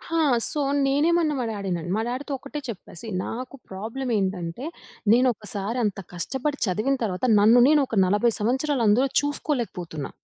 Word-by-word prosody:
ఆ! - - +3 0.3
సో, 300 - -2 0.3
నేనేమన్నా 310 +2 +2
మా 245 - -1
డ్యాడీనన్ 190 -5 -3
మా 220 - 0
డ్యాడీతో 260 +4 -4
ఒక్కటే 275 +3 -7
చెప్పా. 215 - -8
సీ - - -8 0.2
నాకు 255 +3 -6
ప్రాబ్లమ్ 225 +7 -4
ఏంటంటే, 190 +3 -3 0.5
నేనొకసారి 225 -3 0
అంత 205 -1 -2
కష్టపడి 270 - -2
చదివిన 215 +8 0
తరువాత 195 +1 -1
నన్ను 220 +4 +6
నేను 300 -1 +5
ఒక 225 - -3
40 205 +5 +2
సంవత్సరాలు 260 +4 0
అందులో 240 +6 +4
చూసుకోలేకపోతున్నా. 235 - -3
235 Hz, 145 wpm, -25 LUFS, 200-275 Hz, 0.5 s, నన్ను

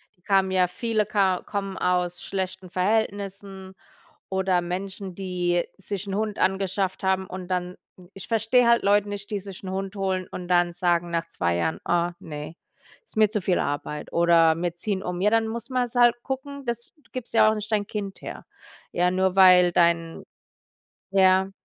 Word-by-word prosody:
die 180 - -36
kamen 190 0 +2
ja 185 -1 +3
viele 215 +3 -1
ka 195 -3 +1
kommen 195 -2 -4
aus 180 -1 0
schlechten 190 -1 -4
Verhältnissen 195 -1 -2 0.5
oder 190 -1 +1
Menschen, 185 +1 -5
die 180 -2 0
sich 200 0 -5
'n 195 - -3
Hund 215 -1 -2
angeschafft 190 0 0
haben, 190 0 +1
und 185 0 -7
dann 180 0 -2 0.4
ich 195 - -10
verstehe 230 +2 +3
halt 235 0 +4
Leute 205 +1 +3
nicht, 205 +1 -6
die 205 - -1
sich 195 -1 -10
'n 185 - -5
Hund 195 +1 -4
holen 190 -2 -1
und 180 - -6
dann 175 -1 +2
sagen 175 -1 0
nach 165 0 -1
2 85 - -1
Jahren: 160 - -1
„Oh, 175 0 +2
ne, 150 +1 -8 0.5
ist - - -15
mir 215 -2 +5
zu 215 -2 -2
viel 180 -1 +2
Arbeit“ 150 +1 -3
oder 170 -1 +5
„Wir 175 -1 -1
ziehen 190 +2 -3
um.“ 180 0 -4
Ja, 210 - +4
dann 225 0 +2
muss 235 +2 -5
man's 250 -2 -1
halt 240 -1 +5
gucken 275 +1 -5
dass 235 0 -4
du 300 -4 -29
gibst 255 -2 -7
ja 220 - +6
auch - - +2
nicht 215 +1 -6
dein 210 -1 +1
Kind 200 -2 -5
her, - - -7 0.5
ja, 180 +1 +2
nur 190 0 +1
weil 180 -2 +7
dein 170 -1 +1 0.9
ja, 190 0 +4
190 Hz, 185 wpm, -25 LUFS, 180-205 Hz, 0.9 s, weil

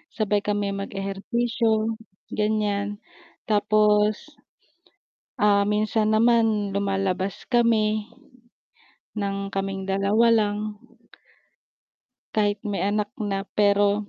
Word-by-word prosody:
sabay 210 -2 +1
kami 205 -1 -1
mag-ehersisyo, 220 +3 -1 0.4
ganyan 210 -1 -1 0.5
tapos, 210 +5 +2 1.1
ah, 200 -1 +4
minsan 215 +1 +1
naman 220 -3 +2
lumalabas 195 -1 -1
kami, 220 -3 +2 1.1
ng 200 -1 -2
kaming 195 0 -3
2 200 +4 +3
lang 205 -2 +1 1.8
kahit 205 -1 +2
may 205 -2 -2
anak 205 +1 -1
na 195 -2 -2
pero, 205 0 +2
210 Hz, 80 wpm, -24 LUFS, 200-215 Hz, 1.8 s, ah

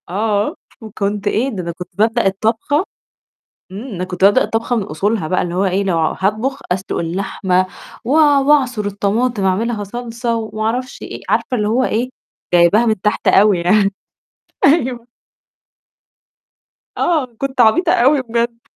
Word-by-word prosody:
آه، 205 +2 0 0.3
وكنت 205 -1 -3
إيه 230 +6 +1
ده 200 -8 -5
أنا 170 - -4
كنت 180 +2 -10
بابدأ 220 +1 +2
الطبخة 225 - 0 0.9
إمم، 200 +4 -7
أنا 180 - -3
كنت 180 0 -7
بابدا 205 +6 +5
الطبخة 230 +2 -1
من 220 - 0
أصولها 195 +2 -2
بقى 185 +3 0
اللي 175 0 -3
هو 190 +2 +1
إيه 190 +1 0
لو 185 -4 0
هاطبخ 215 - -1
أسلق 190 +2 -2
اللحمة 185 +1 -1 0.4
و - - -4
وأعصر 280 -6 +3
الطماطم 205 +3 -1
اعملها 210 +3 0
صلصة 235 +2 -4
وما 215 -1 -4
أعرفش 250 +4 -3
إيه، - - -8
عارفة 250 - 0
اللي 210 -1 0
هو 240 +4 +1
إيه 245 +1 -1 0.4
جايباها 175 +7 +5
من 220 -5 0
تحت 210 - -1
أوي 200 -2 +5
يعني، 195 +3 +2 0.7
أيوه. 255 -5 +2 1.9
آه، 320 -6 +1
كنت 265 -1 0
عبيطة 335 +11 +4
أوي 270 +2 +3
بجد. 235 -1 -2
215 Hz, 145 wpm, -17 LUFS, 195-245 Hz, 1.9 s, بابدا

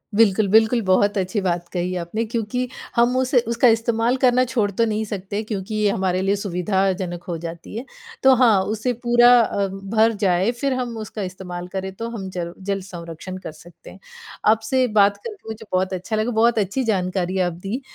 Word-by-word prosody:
बिल्कुल, 215 -1 +4
बिल्कुल 220 +3 +4
बहुत 200 +2 +2
अच्छी 190 +2 -1
बात 175 -2 -1
कही 180 +1 -2
आपने 215 +7 -3
क्योंकि 235 +3 -2 0.3
हम 240 +2 +3
उस 260 +1 -1
उसका 235 +2 +3
इस्तेमाल 230 +2 +2
करना 255 -1 +4
छोड़ 225 -5 0
तो 230 +4 +1
नहीं 220 0 -1
सकते 205 0 -4
क्योंकि 210 -1 -4
ये 210 -1 +2
हमारे 185 -1 0
लिए 195 +1 +1
सुविधाजनक 190 -2 -1
हो 175 -4 -4
जाती 170 +3 -8
है। 240 - -5 0.4
तो 265 - +7
हाँ 230 -6 +4
उसे 220 +5 -1
पूरा 240 0 +6
अ, 200 -3 0
भर 205 +4 +1
जाए 185 +4 +2
फ़िर 260 +2 -2
हम 245 -2 -3
उसका 215 -1 -6
इस्तेमाल 180 -1 -6
करें 190 0 -3
तो 230 +2 -5
हम 195 -5 -6
जल 175 -2 -5
जल 195 0 -3
संरक्षण 175 0 -8
कर - - -6
सकते 170 +2 -15
हैं। - - -15 0.5
आपसे 225 +4 +2
बात 205 -2 +3
करके 425 - -10
मुझे 220 0 -7
बहुत 185 +1 0
अच्छा 185 +5 -3
लगा। 215 +3 0
बहुत 225 0 +3
अच्छी 205 +7 -1
जानकारी 185 -3 -1
आप 175 -1 +1
दी 195 +10 -5
205 Hz, 190 wpm, -22 LUFS, 185-230 Hz, 0.5 s, तो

